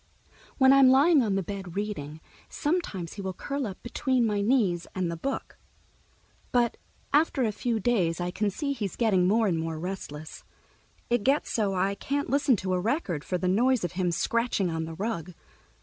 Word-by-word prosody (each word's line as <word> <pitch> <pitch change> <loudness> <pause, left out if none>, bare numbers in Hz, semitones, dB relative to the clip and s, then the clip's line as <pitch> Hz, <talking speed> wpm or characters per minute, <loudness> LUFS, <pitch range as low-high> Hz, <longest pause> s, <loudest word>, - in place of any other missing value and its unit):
When 265 -1 +6
I'm 275 -1 +7
lying 285 +3 +6
on 210 -5 0
the 195 - 0
bed 190 -1 -7
reading, 160 -7 -4 0.3
sometimes 290 - -2
he 205 - -7
will 190 -1 -4
curl 280 +2 -3
up 190 - -9
between 255 0 0
my 210 -2 0
knees 200 -7 +1
and 180 -3 -1
the - - -3
book. 270 +11 -5 0.9
But 240 -2 +2 0.4
after 295 -3 +3
a 220 - +1
few 230 +2 -1
days 185 -7 +1
I 175 0 -2
can 210 +2 0
see 280 +8 -2
he's 210 -8 -4
getting 195 -6 +2
more 220 +3 +3
and 175 -5 +1
more 160 0 -3
restless. 160 -3 -6 0.7
It 240 -3 +2
gets 275 +6 +1
so 205 -4 0
I 190 +2 +1
can't 280 +5 -3
listen 280 -2 +3
to 185 -2 -2
a 180 - +1
record, 200 - -1
for 180 - -2
the 185 - -2
noise 240 +5 +2
of 175 - -2
him 180 -1 0
scratching 230 -1 0
on 160 0 -2
the 160 0 -7
rug. 180 -3 -4
205 Hz, 190 wpm, -27 LUFS, 180-250 Hz, 0.9 s, I'm